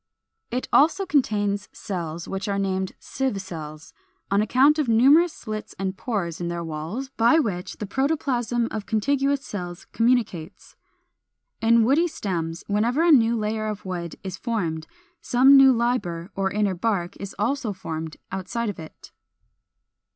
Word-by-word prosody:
It 250 +2 -3
also 335 +7 +4
contains 205 - 0
cells 170 -4 -5
which 195 +2 -4
are 200 -1 -1
named 190 -1 -1
sieve 265 -7 -3
cells, 155 -5 -8 0.4
on 200 +1 +3
account 265 +8 +4
of 285 -6 0
numerous 280 +10 +5
slits 215 -6 -7
and 190 0 -2
pores 190 -7 -3
in 175 - -2
their 170 0 -3
walls, 165 - -5
by 235 +7 +5
which 195 - -2
the 210 - -4
protoplasm 250 -2 0
of 210 -2 -5
contiguous 275 +5 +1
cells 180 -2 -6
communicates. 225 -9 -1 0.9
In 230 0 +5
woody 290 +9 +3
stems, 170 - -4
whenever 230 +9 +1
a 340 - +5
new 235 -4 +5
layer 215 0 -2
of 210 -2 -5
wood 175 -3 -4
is 190 -1 -5
formed, 175 -9 -2 0.3
some 265 +3 +5
new 270 -1 +8
liber 230 -7 -1
or 195 0 0
inner 205 -1 0
bark 185 -1 -1
is 200 0 -7
also 240 +2 -1
formed 160 -4 -6
outside 195 +5 -3
of 205 - -6
it. 160 -1 -12
210 Hz, 150 wpm, -24 LUFS, 185-250 Hz, 0.9 s, new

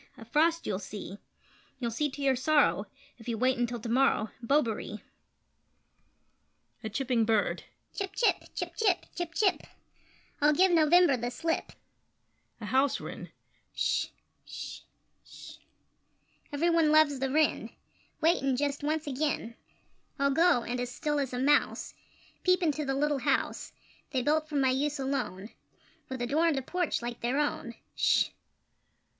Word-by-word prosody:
A 225 - -11
frost 325 +7 +2
you'll 195 -3 -2
see 200 0 -8 0.6
You'll 240 -3 -3
see 295 +6 -1
to 280 +1 -7
your 270 -1 +3
sorrow, 295 +4 +2 0.3
If 225 - -13
you 230 -2 -2
wait 255 +2 +1
until 240 0 -1
to 225 - -7
morrow 235 -2 +2
Bobaree! 230 -5 0 1.8
[A 220 - -3
Chipping 245 +1 0
Bird]: 220 -1 0 0.3
Chip 390 -1 -4
chip! 480 - +2
Chip - - -4
chip! 395 -6 +1
Chip 340 -1 -4
chip! 395 -4 +2 0.8
I'll 300 +1 +5
give 370 +4 +4
November 335 -2 +5
the 240 +1 -3
slip! 325 +7 -2 0.9
[A 220 - -7
House 265 +4 +2
Wren]: - - -8 0.5
Sh! - - +1 0.4
Sh! - - -8 0.4
Sh! - - -12 0.9
Every 320 +4 +1
one 325 -2 +3
loves 305 -3 +4
the 270 0 -1
Wren! 305 +3 +1 0.5
Wait, 335 +3 +3
and 270 -2 0
just 285 0 -1
once 310 +1 -1
again 280 -4 -2 0.6
I'll 280 0 +2
go, 325 -4 +4
and, 245 +1 -3
as 245 0 -2
still 295 +4 -2
as 275 -3 -2
a 250 - -4
mouse, 285 +3 +1 0.5
Peep 365 0 +3
into 300 -2 0
the 270 0 -1
little 290 0 +1
house - - -1 0.4
They 260 -3 -1
built 310 +2 +1
for 300 - -5
my 265 -2 +3
use 290 +3 0
alone, 250 -8 -3 0.6
With 260 -2 -4
a - - +1
door 305 +7 +2
and 315 -4 +2
a 270 - -2
porch 355 -3 -1
like 240 0 -5
their 245 +4 0
own! 285 -5 -2 0.2
Sh! - - +3
275 Hz, 155 wpm, -29 LUFS, 245-310 Hz, 1.8 s, I'll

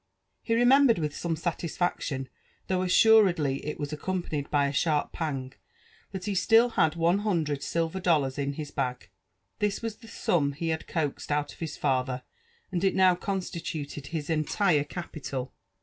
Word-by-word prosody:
He 230 - 0
remembered 245 0 +5
with 150 -3 -2
some 170 -1 -2
satisfaction, 165 -4 -2 0.4
though 185 -1 0
assuredly 185 -7 +4
it 150 - -5
was 145 +1 -4
ao - - -3
eompanied 170 -5 -3
by 145 -1 +3
a 140 - -1
sharp 150 -1 +1
pang, 135 -5 -3 0.6
that 190 -2 -5
he 205 - -1
still 225 +5 +4
liad 160 -7 +2
one 170 +3 +2
hundred 165 -9 0
silver 165 +4 -1
dollars 150 -7 +1
in 140 0 -1
his 150 0 -6
bag. 125 -5 -3 0.5
This 210 +1 -1
was 225 -2 -3
the 225 - -15
sum 150 -9 0
he 165 +3 -3
had 160 0 -2
coaxed 150 -3 -2
out 145 0 0
of - - -19
his 160 -2 -5
father, 130 -2 0 0.5
and 180 -1 -1
U 195 - +5
now 185 -1 +5
constituted 170 -6 -4
his 155 -3 -4
entire 155 0 +2
capital. 140 -5 -6
160 Hz, 165 wpm, -28 LUFS, 145-185 Hz, 0.6 s, remembered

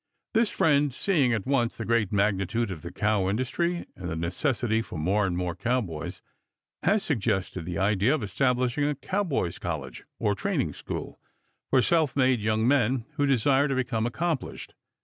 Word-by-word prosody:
This 225 -1 +3
friend, 145 -2 +3
seeing 140 -2 +1
at 110 -5 -1
once 130 -4 +1
the 110 - -4
great 115 -4 +1
magnitude 100 +2 +1
of 85 -4 -6
the 85 - -7
cow 100 0 +1
industry 170 - -1
and 90 -1 -6
the 80 - -3
necessity 110 - 0
for 110 - -7
more 95 +6 +1
and 90 -1 -2
more 90 -1 -1
cowboys, 105 - -3 0.6
has 200 +3 +2
suggested 95 - -1
the 85 -1 -4
idea 105 - +2
of 135 - -4
establishing 125 +6 +1
a 145 0 0
cowboys' 145 - -2
college, - - -5
or - - +1
training - - -1
school, - - -6 0.5
for 130 -2 +4
self 160 -5 +2
made 130 -3 +3
young 110 +2 +1
men 130 -3 +2
who 145 -1 +2
desire 135 +2 +3
to 135 - -1
become 120 -3 0
accomplished. 160 +2 -3
120 Hz, 170 wpm, -27 LUFS, 100-140 Hz, 0.6 s, for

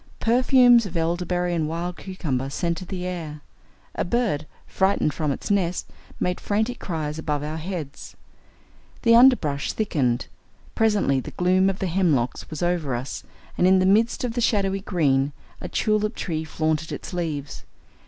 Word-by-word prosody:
Perfumes 245 -1 +5
of 175 -2 -5
elderberry 175 +1 0
and 160 -3 0
wild 170 +2 -4
cucumber 140 -9 -3
scented 170 +5 -3
the 185 -2 -4
air. 160 -5 -5 0.5
A - - -1
bird, 175 -8 0 0.2
frightened 190 -6 +1
from 155 -3 -1
its 140 - -4
nest, 180 -3 0 0.3
made 180 0 -1
frantic 220 +4 -1
cries 155 -3 -4
above 150 -2 -2
our 155 +2 -4
heads. 160 -4 -6 0.9
The 230 - +5
underbrush 230 - +4
thickened. 135 - 0 0.5
Presently 210 -11 +2
the - - -6
gloom 185 +2 +2
of 195 - -3
the 195 - -2
hemlocks 160 -9 0
was 155 +1 -4
over 170 -7 0
us, 125 +3 -5 0.4
and 180 - +5
in 190 0 +6
the 185 - +3
midst 220 +6 +3
of 245 -2 -2
the 240 - -1
shadowy 195 -4 +1
green 145 -7 +1 0.3
a - - -6
tulip 215 0 0
tree 160 -3 -3
flaunted 155 0 -1
its - - -6
leaves. 155 -5 -4
175 Hz, 155 wpm, -24 LUFS, 155-195 Hz, 0.9 s, in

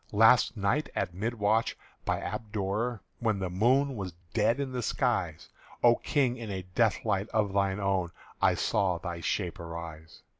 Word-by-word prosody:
"Last 115 +3 +5
night 105 +10 +1
at 90 - -1
mid 110 +6 -2
watch, 110 +1 +1 0.3
by - - 0
Aberdour, 105 +2 -2 0.2
When 110 -4 +1
the 95 -2 -3
moon 130 +8 +3
was 95 -5 -5 0.2
dead 115 +4 +2
in 140 -2 -2
the 125 -1 -2
skies, - - -1 0.4
O 120 0 +7
King, 130 -5 +1
in 115 -2 -6
a 95 -2 -4
death - - +2
light 100 +2 0
of 105 -3 0
thine 100 0 +1
own 95 -3 0 0.3
I - - +4
saw 95 -3 +1
thy 85 0 -5
shape 90 0 -2
arise. 85 -1 -8
105 Hz, 165 wpm, -29 LUFS, 95-115 Hz, 0.4 s, O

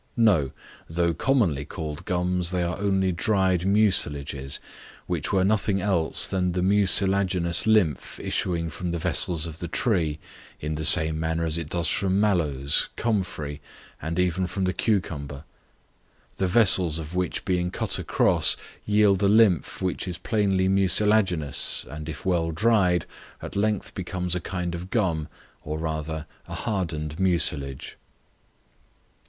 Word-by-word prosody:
No, 100 - +3 0.4
though 85 +1 0
commonly 90 - 0
called 75 0 -7
gums, 90 -1 0
they 90 -1 -1
are 90 +3 -3
only 95 -2 +1
dried 95 0 0
mucilages, 75 -9 +1 0.5
which - - -3
were 95 -2 +2
nothing 100 0 +1
else 95 -5 0
than 90 -2 -1
the 90 0 -1
mucilaginous 95 -2 +3
lymph 100 -10 +1
issuing 85 -2 -2
from 90 - -5
the 85 - -2
vessels 85 0 0
of 80 -1 -7
the 85 - -4
tree, 85 -6 0 0.4
in 75 +1 -4
the 80 0 -3
same 80 0 +6
manner 80 +1 -2
as 80 0 -1
it 80 -2 -6
does 85 -2 -1
from 95 +3 0
mallows, 75 -9 +1
comfrey, 90 -10 -3 0.4
and 80 +3 -4
even 90 0 0
from 95 +2 -4
the 90 0 0
cucumber; 80 -9 -2 0.9
the 95 - 0
vessels 90 -5 +4
of 80 0 -7
which 90 -2 -3
being 90 -1 0
cut - - -1
across, - - +3 0.3
yield 105 -2 +3
a 100 - +3
lymph 100 -7 +2
which 90 +1 -2
is 90 - -4
plainly 100 -4 0
mucilaginous, 95 -5 +3
and 75 +1 -7
if 80 - -8
well 85 -3 0
dried, 90 -2 +1 0.3
at - - -9
length 105 0 -1
becomes 90 -1 -3
a 90 - 0
kind 90 -2 -4
of 85 +2 -7
gum, 90 -9 -1 0.4
or 75 +1 -4
rather, 80 0 -4 0.2
a - - -7
hardened 80 -6 -4
mucilage. 75 -7 +1
90 Hz, 145 wpm, -24 LUFS, 80-95 Hz, 0.9 s, same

